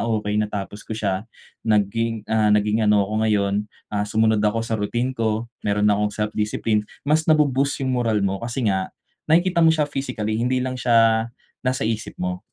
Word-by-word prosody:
okay 105 -1 0
natapos 105 -1 -4
ko 110 - -6
siya, 100 0 -2 0.3
naging 110 +1 0
ah, 110 -1 +2
naging 105 +1 +2
ano 105 -1 +4
ako 105 +2 -5
ngayon, 105 -2 +1 0.4
ah, 105 0 -1
sumunod 110 0 +2
ako 105 +2 +1
sa 115 - -5
routine 120 +5 -1
ko, 110 -2 -1 0.2
meron 105 0 0
na 105 -1 +3
akong 105 - +2
self-discipline." 105 0 -1 0.2
Mas 155 +3 +1
na 155 - +6
bu-boost 140 -1 +1
yung 130 - 0
moral 115 -5 +1
mo, 95 0 -1
kasi 120 +2 -3
nga 95 -3 0 0.4
nakikita 175 +2 +3
mo 165 - +6
siya 160 -2 +3
physically 125 -6 -3
hindi 125 +2 +1
lang 130 0 -3
siya 115 -1 +3 0.3
nasa 130 -2 -1
isip 110 0 -3
mo. 90 0 -3
110 Hz, 180 wpm, -22 LUFS, 105-120 Hz, 0.4 s, na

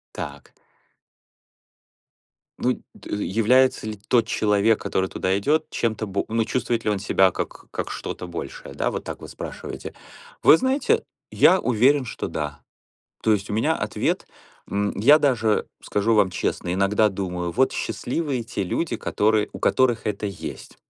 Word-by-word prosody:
Так. - - -7 2.1
Ну, 125 0 0
д - - -7
является 115 +4 +3
ли 110 - -4
тот 120 -3 +4
человек, 105 0 +2
который 95 0 -1
туда 95 +1 0
идет, 155 +9 +1
чем-то 110 -2 -1
бо 100 0 -2
ну, 115 0 +1
чувствует 115 0 -1
ли 105 - +1
он 105 - 0
себя 95 -1 +3
как - - -6
как - - -4
что-то 90 - -5
большее, 85 -1 -7
да? - - 0
Вот - - -5
так - - -6
вы - - -9
спрашиваете. - - -7 0.5
Вы - - +8
знаете, 285 - +1 0.3
я 185 - +5
уверен, 130 +3 +3
что - - -5
да. 75 -2 -4 0.6
То 110 - +3
есть 100 -1 0
у 105 - -2
меня 110 - +2
ответ, - - -1 0.4
м. 100 0 0
Я 145 +9 +6
даже 115 -7 +2 0.2
скажу 105 +3 +1
вам 105 -3 +4
честно, 85 0 -2
иногда 100 +3 +3
думаю: 90 -3 -3
"Вот 130 +9 +2
счастливые 125 +4 -2
те 105 -3 -3
люди, 160 - -1
которые 105 0 +1
у - - -5
которых 125 -4 +2
это 105 0 -2
есть". 100 -3 -7
110 Hz, 155 wpm, -24 LUFS, 100-125 Hz, 2.1 s, Вы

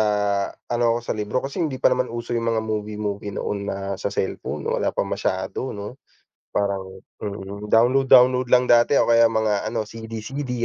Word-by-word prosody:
ah, 105 -2 +1 0.2
ano 120 -1 +2
ako - - -3
sa - - -1
libro 105 +5 -2
Kasi 140 +6 -4
hindi 150 -6 -1
pa - - +5
naman 125 0 0
uso 120 +1 -5
'yong 115 -1 0
mga 110 - 0
movie-movie 105 -1 -4
noon 105 - -2
na 100 - -3 0.2
sa - - -1
cellphone, 100 -1 -3
wala - - 0
pa - - +1
masyado 95 +6 -3
'no? 105 +6 -8 0.5
Parang 100 -1 0 0.4
mm, 100 0 -6
download-download 125 +1 +5
lang 125 0 +5
dati 120 +4 +5
o - - +3
kaya 115 -1 +5
mga 110 -2 +1
ano 110 -2 -2
CD-CD. 115 +5 -6
110 Hz, 175 wpm, -23 LUFS, 105-125 Hz, 0.5 s, pa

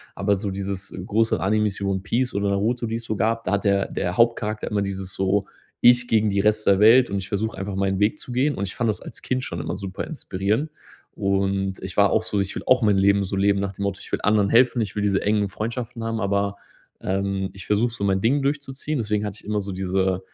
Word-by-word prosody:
Aber 100 0 +1
so 100 +1 -3
dieses, 100 0 -4
äh, - - -8
große 110 -2 +1
Anime 105 +4 +2
One 95 -1 -1
Peace 120 +6 -1
oder 100 0 0
Naruto, 115 +4 0
die 115 - -2
es 115 0 -5
so 110 - -2
gab, 115 +2 0
da - - 0
hat 100 - 0
der 100 -1 +2
der 90 +1 -2
Hauptcharakter 115 -2 +1
immer 105 -1 0
dieses 95 -1 -3
so: 95 +1 +1 0.3
„Ich 120 0 +5
gegen 110 -1 +3
die 100 0 +1
Rest 105 +1 +1
der 100 -1 +5
Welt 120 +4 +7
und 100 0 -1
ich 95 - -7
versuche 110 +2 -2
einfach 95 0 -4
meinen 95 0 0
Weg 110 +9 +1
zu 125 - -7
gehen!" 140 +4 +1
Und 100 - -2
ich 90 - -7
fand 120 -2 0
das 105 - -1
als - - -10
Kind 130 0 -2
schon 85 -2 -4
immer 80 - -4
super 95 -1 -5
inspirierend. 110 - -2 0.5
Und 95 0 0
ich 95 -1 -6
war 100 -1 +5
auch 110 - +2
so. 105 -2 -1
Ich 95 0 -3
will - - -5
auch 130 -1 +5
mein 105 -3 +3
Leben 100 +1 +3
so 100 0 -3
leben 100 0 +3
nach 100 - -2
dem 100 - -6
Motto: 100 -1 -2
„Ich - - -13
will - - 0
anderen 105 -1 +3
helfen!" 125 0 +4
Ich 100 -3 -4
will 105 - -1
diese 100 -1 +1
engen 105 -1 +1
Freundschaften 115 +3 -5
haben, 115 0 -2
aber, 100 0 0 0.4
ähm, 95 0 -2
ich 95 - -10
versuche 105 +4 +2
so 110 - -5
mein 95 -1 +2
Ding 135 +7 +2
durchzuziehen. 140 +1 -2
Deswegen 105 -1 -1
hatte 105 -2 -5
ich - - -18
immer 105 -1 -1
so 100 - -5
diese 95 0 -2
äh, 95 -1 +1
100 Hz, 255 wpm, -23 LUFS, 95-115 Hz, 0.5 s, Welt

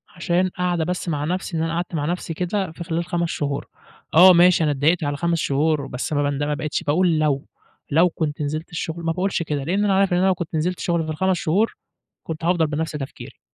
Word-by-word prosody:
عشان 175 +1 +1
قعدة 180 -2 -1
بس 180 0 -3
مع 150 -2 -1
نفسي، 180 0 -2
إن 160 - 0
أنا 165 0 -2
قعدت 175 0 -3
مع 145 -2 -1
نفسي 170 0 -3
كده 180 +2 -2
في 170 +2 -8
خلال 170 0 -2
5 170 -1 -1
شهور. 140 -2 -3 0.5
آه، 180 +3 +9
ماشي 175 0 +5
أنا 150 - +2
اتضايقت 155 +5 +2
على 145 -1 -1
5 170 +2 0
شهور، 145 0 +1
بس 125 +4 -4
ما 145 0 +1
باند 145 0 -1
ما 150 0 0
بقيتش 150 +3 -3
باقول 165 +1 +2
لو، 145 -2 +1 0.5
لو 165 +5 +5
كنت 155 -3 -3
نزلت 155 +3 -3
الشغل 165 0 -4
ما 165 - 0
باقولش 180 0 -1
كده، 150 -3 -3
لأن 190 +8 0
أنا 200 - +2
عارف 195 -2 +2
إن - - +3
أنا 185 - +3
لو 190 - +4
كنت 175 -2 -5
نزلت 175 +3 -1
شغل 170 -2 0
في - - -6
ال5 190 +4 +1
شهور 195 +9 +1 0.5
كنت 160 0 -5
هافضل 170 -2 +2
بنَفْس 155 +2 -2
تفكيري، 140 -3 -8
165 Hz, 230 wpm, -22 LUFS, 150-180 Hz, 0.5 s, آه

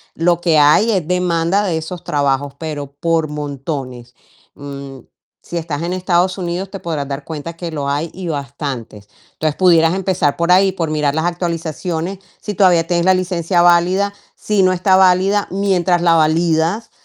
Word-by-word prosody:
lo 170 +1 +2
que 165 -3 +3
hay 155 +10 +5
es 185 -7 -1
demanda 180 +1 +1
de 175 -5 -1
esos 165 +2 -6
trabajos, 140 -1 0
pero 145 -3 -6
por 165 -1 +1
montones. 140 -4 -6 0.4
Mm, 140 -1 -9 0.4
si 175 - -5
estás 160 -2 -4
en 170 - -3
Estados 185 0 +1
Unidos, 180 +1 -3
te 195 0 -7
podrás 155 -4 -4
dar 140 0 -5
cuenta, 160 +1 -6
que 170 0 -6
lo 145 -3 -3
hay, 150 +4 -2
y 185 -1 -7
bastantes. 135 -7 -5 0.3
Entonces, 155 -1 -2
pudieras 170 -2 +4
empezar 185 -6 0
por 170 +1 +1
ahí, 190 +1 +5
por 170 -4 -3
mirar 150 -1 0
las 160 - 0
actualizaciones, 170 +1 -3 0.2
si 210 - -5
todavía 180 -4 +4
tienes 175 -1 +1
la 190 - +5
licencia 175 -1 0
válida, 180 +4 +3 0.2
si 210 -2 0
no 185 - +4
está 185 +1 +2
válida. 190 +2 +3
Mientras 185 -3 +1
la 170 -1 +4
validas, 165 +5 +1
170 Hz, 170 wpm, -17 LUFS, 150-185 Hz, 0.4 s, hay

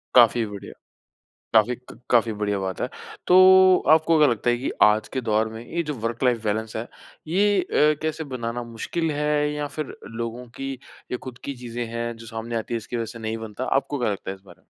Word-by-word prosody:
काफ़ी 120 -1 +6
बढ़िया। 100 -1 -8 0.8
काफ़ी 115 +3 +4
क 125 0 -15
काफ़ी 115 -2 +3
बढ़िया 105 -1 -1
बात 95 -1 -4
है। - - 0 0.4
तो 180 - +6 0.5
आपको 160 +1 +5
क्या 150 - +6
लगता 120 0 +1
है 120 - +2
कि 130 - -3
आज 105 0 +4
के 130 - -1
दौर 110 -1 +1
में 110 0 -8
ये 170 +1 -2
जो 150 -1 -3
वर्क 115 +1 -3
लाइफ़ 120 -3 +2
बैलेंस 110 +1 -2
है, 110 +2 -3 0.4
ये 200 +3 +3
अ, 150 -3 +3
कैसे 155 0 -2
बनाना 120 -3 -4
मुश्किल 155 +8 -3
है 150 0 +1
या 150 0 -2
फिर 155 - -4
लोगों 115 +2 -5
की 135 0 -3 0.4
ये 125 - -1
खुद 125 -2 -9
की 140 - -4
चीज़ें 120 -1 -5
हैं 120 0 -3
जो 115 - -11
सामने 115 +1 -5
आती 115 +1 -3
हैं - - +1
इसकी 115 +2 -6
वज़ह 115 - -1
से 115 - -9
नहीं 110 0 -3
बनता। 110 -2 -6
आपको 140 0 0
क्या 120 - +1
लगता 100 -1 -5
है - - -6
इस 95 - -21
बारे - - -16
में? - - -37
120 Hz, 225 wpm, -24 LUFS, 110-145 Hz, 0.8 s, काफ़ी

